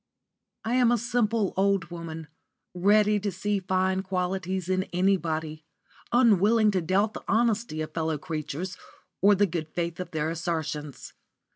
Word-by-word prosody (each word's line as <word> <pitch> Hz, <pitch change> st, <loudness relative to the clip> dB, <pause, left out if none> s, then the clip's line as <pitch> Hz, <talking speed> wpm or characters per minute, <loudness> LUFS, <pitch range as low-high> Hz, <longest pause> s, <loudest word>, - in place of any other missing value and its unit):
*_ -, -, -58 dB, 0.7 s
I 250 Hz, -, +2 dB
am 245 Hz, -2 st, +4 dB
a 240 Hz, -, +3 dB
simple 230 Hz, -3 st, 0 dB
old 195 Hz, -2 st, +1 dB
woman, 165 Hz, -2 st, -7 dB, 0.5 s
ready 210 Hz, +3 st, +3 dB
to 205 Hz, 0 st, -2 dB
see 205 Hz, +3 st, -1 dB
fine 190 Hz, 0 st, 0 dB
qualities 185 Hz, -1 st, -2 dB
in 185 Hz, 0 st, +1 dB
anybody, 160 Hz, -4 st, -1 dB, 0.5 s
unwilling 220 Hz, -2 st, +4 dB
to 190 Hz, -2 st, 0 dB
doubt 195 Hz, +6 st, +1 dB
the -, -, -8 dB
honesty 225 Hz, -6 st, +1 dB
of 155 Hz, 0 st, -5 dB
fellow 160 Hz, -1 st, -1 dB
creatures 160 Hz, +2 st, -5 dB, 0.4 s
or 205 Hz, +1 st, +6 dB
the 205 Hz, +1 st, +3 dB
good 165 Hz, -4 st, -3 dB
faith 170 Hz, +1 st, -4 dB
of 180 Hz, -2 st, -5 dB
their 160 Hz, -2 st, -2 dB
assertions. 160 Hz, -4 st, -4 dB
185 Hz, 150 wpm, -27 LUFS, 165-205 Hz, 0.7 s, or